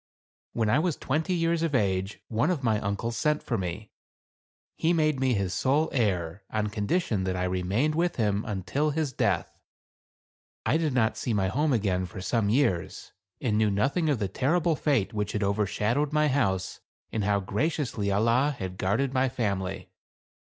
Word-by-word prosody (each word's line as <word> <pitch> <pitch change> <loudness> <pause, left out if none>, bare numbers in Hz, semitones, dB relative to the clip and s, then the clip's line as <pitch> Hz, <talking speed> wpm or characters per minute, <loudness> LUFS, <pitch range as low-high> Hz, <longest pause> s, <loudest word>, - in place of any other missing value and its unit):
When 115 -2 0
I 105 - +3
was 165 -2 0
twenty 160 +6 -1
years 165 -1 +1
of 165 -4 0
age 95 -2 0
one 115 +8 +1
of 165 -7 -1
my 110 -3 +2
uncles 100 +4 -2
sent 150 +3 +1
for 120 - -2
me. 95 +2 -4 0.8
He 165 +2 +1
made 155 -4 +2
me 130 -2 +2
his 95 -3 -1
sole 145 +4 +2
heir, 95 -7 0
on 105 -1 -1
condition 105 - 0
that 95 -1 -1
I 90 - -1
remained 95 +11 0
with 175 +2 0
him 105 -2 0
until 110 - -1
his 150 -2 -1
death. - - -1 1.1
I 155 - +3
did 160 -4 0
not 110 -3 +2
see 115 - -1
my 95 -2 +1
home 145 +8 +1
again 95 -6 +1
for 95 - -9
some 100 +2 0
years, 105 -8 0 0.3
and 110 -5 0
knew 110 -1 +3
nothing 135 - +1
of 145 - +2
the 105 -3 -1
terrible 160 - +1
fate 135 -11 +1
which 105 -1 -2
had 105 - -1
overshadowed 105 +7 0
my 150 0 +3
house, 95 -9 0 0.3
and 110 - -1
how 100 0 +2
graciously 110 - -1
Allah 115 +8 +2
had 95 -2 -6
guarded 115 +8 0
my 130 0 +2
family. 100 -6 -3
115 Hz, 175 wpm, -27 LUFS, 100-145 Hz, 1.1 s, I